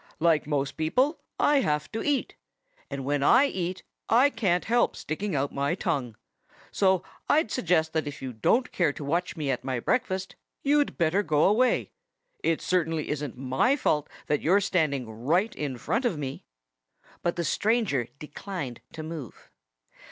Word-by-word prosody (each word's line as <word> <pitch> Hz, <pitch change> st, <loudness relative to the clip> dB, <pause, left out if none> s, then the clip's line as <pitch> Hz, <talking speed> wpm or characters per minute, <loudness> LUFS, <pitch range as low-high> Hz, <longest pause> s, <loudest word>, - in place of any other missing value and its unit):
"Like 160 Hz, -3 st, +3 dB
most 140 Hz, -2 st, -1 dB
people, 255 Hz, -, +1 dB, 0.2 s
I 290 Hz, -, +4 dB
have 150 Hz, -, -1 dB
to 225 Hz, -, -3 dB
eat. 290 Hz, -2 st, 0 dB, 0.5 s
And 135 Hz, -1 st, -5 dB
when 145 Hz, 0 st, 0 dB
I 245 Hz, -, +6 dB
eat 185 Hz, -7 st, -3 dB, 0.3 s
I 255 Hz, +5 st, +5 dB
can't 190 Hz, -8 st, +1 dB
help 240 Hz, +1 st, +2 dB
sticking 190 Hz, +3 st, -3 dB
out 140 Hz, +1 st, -1 dB
my 140 Hz, +4 st, 0 dB
tongue. 125 Hz, -, -2 dB, 0.6 s
So 190 Hz, -3 st, +2 dB, 0.3 s
I'd 295 Hz, -8 st, +3 dB
suggest 160 Hz, -3 st, +1 dB
that 160 Hz, -2 st, 0 dB
if 145 Hz, -, -6 dB
you 130 Hz, -2 st, -5 dB
don't 235 Hz, -, +2 dB
care 170 Hz, -5 st, +2 dB
to -, -, -7 dB
watch 170 Hz, +5 st, -1 dB
me 145 Hz, -3 st, -1 dB
at 125 Hz, -, -3 dB
my 130 Hz, -2 st, -2 dB
breakfast 190 Hz, -, -1 dB, 0.3 s
you'd 290 Hz, +1 st, +2 dB
better 170 Hz, +2 st, +2 dB
go 150 Hz, -5 st, +2 dB
away. 240 Hz, +6 st, +3 dB, 0.5 s
It 165 Hz, -, +1 dB
certainly 165 Hz, -4 st, 0 dB
isn't 145 Hz, -4 st, -3 dB
my 135 Hz, -, +2 dB
fault 150 Hz, -, 0 dB, 0.2 s
that 150 Hz, -, 0 dB
you're 185 Hz, +5 st, +4 dB
standing 155 Hz, -, 0 dB
right 150 Hz, -, 0 dB
in 140 Hz, -4 st, -3 dB
front 230 Hz, -, -1 dB
of 195 Hz, -10 st, +1 dB
me." 135 Hz, -2 st, -5 dB, 0.8 s
But 170 Hz, -, 0 dB
the 170 Hz, -, -1 dB
stranger 200 Hz, -, +1 dB
declined 150 Hz, -, -6 dB
to 160 Hz, -, -6 dB
move. 155 Hz, -7 st, -8 dB
165 Hz, 165 wpm, -27 LUFS, 140-205 Hz, 0.8 s, I